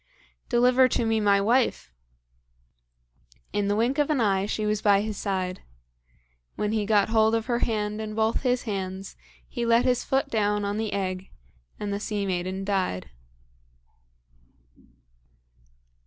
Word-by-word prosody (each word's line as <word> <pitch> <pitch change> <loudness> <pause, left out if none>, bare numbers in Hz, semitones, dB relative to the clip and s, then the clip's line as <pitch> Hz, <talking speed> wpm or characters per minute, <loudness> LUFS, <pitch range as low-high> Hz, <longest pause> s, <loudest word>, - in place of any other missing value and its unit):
"Deliver 250 +2 +5
to 235 - 0
me 225 0 +1
my 200 -1 +4
wife!" 230 - +1 1.6
In 205 -1 0
the 205 - +1
wink 240 +6 +1
of 295 - +2
an 300 -3 +1
eye 200 -3 +1
she 215 0 -2
was 210 0 0
by 200 -1 +4
his 215 0 -4
side. 185 -2 -3 0.9
When 210 0 -1
he 215 -2 -1
got 210 -2 +3
hold 220 0 +3
of 225 -1 -1
her 240 -2 0
hand 210 -2 -1
in 215 -1 -5
both 220 +1 +1
his 250 -1 0
hands, 190 -3 -5 0.3
he 240 - -4
let 235 0 +3
his 250 -1 +2
foot 270 0 0
down 210 -2 +1
on 200 +1 -2
the 220 -1 -2
egg 185 -1 -3 0.5
and 205 -1 -3
the 200 - -2
sea 210 -1 -2
maiden 185 +1 -2
died. 185 - -2
210 Hz, 150 wpm, -26 LUFS, 200-230 Hz, 1.6 s, Deliver